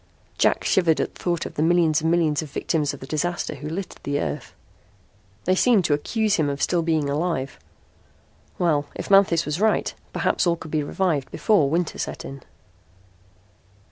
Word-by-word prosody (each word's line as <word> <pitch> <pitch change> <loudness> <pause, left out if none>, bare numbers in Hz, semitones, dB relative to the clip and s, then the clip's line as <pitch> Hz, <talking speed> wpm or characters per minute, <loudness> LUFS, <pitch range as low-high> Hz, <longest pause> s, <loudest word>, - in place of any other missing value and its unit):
Jack - - +3
shivered 170 -4 +2
at - - -2
the - - -15
thought 175 -2 0
of - - -7
the - - -2
millions 165 -1 +3
and 160 - +1
millions 165 -3 +2
of 155 - -7
victims 150 0 -1
of 145 - -10
the - - -7
disaster 175 +5 -2
who 150 - -7
littered 185 +4 -6
the 145 0 -2
Earth. - - -4 0.9
They 185 - +3
seemed 205 -1 +3
to 150 - +2
accuse 215 +8 0
him 155 -3 +1
of 140 0 -3
still 175 +2 +1
being 160 -3 0
alive. 145 -2 -2 1.0
Well, 155 -5 +1
if - - -6
Manthis 195 -4 +5
was 150 +5 -3
right, 220 0 +2 0.2
perhaps - - +1
all 170 - +3
could 160 -2 -10
be 155 - +1
revived 150 -2 -1
before 200 -11 +2
winter 170 +2 -1
set - - -4
in. 135 0 -8
160 Hz, 180 wpm, -23 LUFS, 145-175 Hz, 1.0 s, Manthis